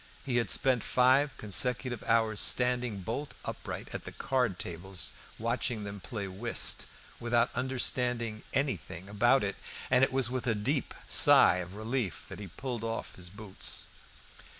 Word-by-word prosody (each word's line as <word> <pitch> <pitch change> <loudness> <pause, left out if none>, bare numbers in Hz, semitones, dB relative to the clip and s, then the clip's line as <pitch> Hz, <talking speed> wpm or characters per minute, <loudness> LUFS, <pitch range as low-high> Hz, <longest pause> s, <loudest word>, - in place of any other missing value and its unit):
He 125 -3 0
had 115 -5 +1
spent 130 -3 +4
five 130 +3 +3
consecutive 120 +4 +1
hours 110 -2 +2
standing 125 -4 +2
bolt 120 +10 -4
upright - - -6
at - - -4
the - - -8
card 125 -8 0
tables, 90 +1 -2 0.3
watching 115 -1 -2
them 100 0 -6
play 100 -1 -5
whist, 105 +6 -1 0.3
without 120 +1 +1
understanding 125 -3 -1
anything 95 - -2
about 120 +6 +3
it, 100 -1 -2 0.3
and 130 +1 +5
it 135 - +3
was 130 -2 +1
with 130 -1 -3
a 115 - +2
deep 130 +7 -1
sigh 90 - +7
of 90 +1 -6
relief 110 -2 -3
that - - -8
he 100 - -7
pulled 120 +5 -5
off 115 0 -4
his 90 -1 -8
boots. 100 0 -4
115 Hz, 150 wpm, -30 LUFS, 100-125 Hz, 0.3 s, sigh